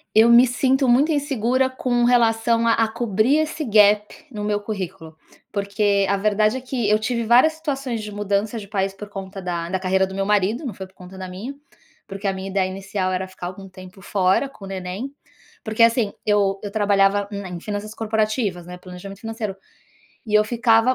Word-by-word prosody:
Eu 220 +2 +7
me 240 +2 +7
sinto 265 +2 +1
muito 280 +7 +4
insegura 265 -3 +1
com 250 -2 0
relação 230 -1 +3
a 230 - +5
a 225 -1 +2
cobrir 235 +5 +1
esse 310 0 -1
gap 210 +3 +3
no 210 -2 -5
meu 210 0 0
currículo, 190 -6 -6 0.4
porque 200 -1 +1
a 200 - +2
verdade 215 +3 +2
é - - -6
que 250 -4 -2
eu 210 - +5
tive 235 +2 -2
várias 250 +8 +5
situações 275 -7 -3
de 210 - -7
mudança 205 +2 -1
de 200 -2 -7
país 195 -1 -1
por 205 +1 -9
conta 195 -1 -8
da 170 -2 -3
da 190 +1 -1
carreira 190 0 +1
do 190 - -8
meu 195 - -1
marido, 210 - +1
não 230 - -4
foi 190 0 -8
por 190 - -29
conta 180 +1 -12
da 185 -1 -7
minha, 210 +10 -6 0.5
porque 195 +1 -5
a 195 - +1
minha 190 0 -6
ideia 190 -1 +1
inicial 195 0 -3
era 190 +1 -2
ficar 185 -1 -7
algum 195 +2 -9
tempo 185 +1 -13
fora 190 +8 +1
com 200 -8 -12
o - - -9
neném, 195 +8 -5 0.5
porque 220 +1 +2
assim, 230 -2 +3
eu 200 -2 +2
eu 205 - -5
trabalhava 200 -1 +2
n 200 -1 -5
em 180 -1 -6
finanças 210 +2 -5
corporativas, 215 -4 -1
né, 180 0 -9
planejamento 185 +2 -10
financeiro, 225 -3 -4 0.7
e 215 -1 -4
eu 210 - +6
ficava 230 +2 +3
210 Hz, 200 wpm, -22 LUFS, 195-235 Hz, 0.7 s, Eu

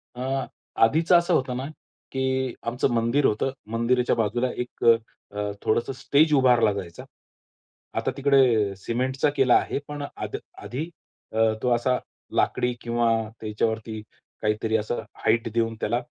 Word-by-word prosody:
अं, 130 +2 -2 0.4
आधीच 160 +10 +3
असं 175 0 +5
होतं 130 -5 +1
ना, 130 - -3 0.5
की 130 -1 -1
आमचं 120 +3 +1
मंदिर 115 +5 +2
होतं, 110 +5 +1 0.2
मंदिराच्या 120 +2 +2
बाजूला 120 +3 0
एक 125 - -8 0.5
अ, 105 - -4 0.2
थोडंसं 120 +4 0
स्टेज 145 +4 +3
उभारला 125 -5 +5
जायचा. 90 -4 -7 1.0
आता - - -1
तिकडे 130 -8 +3
सिमेंटचा 130 +7 0
केला 130 -3 +4
आहे, - - +1
पण 145 0 -6 0.2
आध - - -4 0.3
आधी 140 +6 -4 0.5
अ, 110 0 +3
तो 125 - +2
असा 125 +2 +1 0.4
लाकडी 125 0 +1
किंवा 120 0 0 0.3
त्याच्यावरती 110 0 -2 0.4
काहीतरी 110 +1 +1
असा 110 +2 -2 0.3
हाईट 115 0 +2
देऊन 115 -1 0
त्याला 120 +3 0
120 Hz, 135 wpm, -25 LUFS, 115-130 Hz, 1.0 s, असं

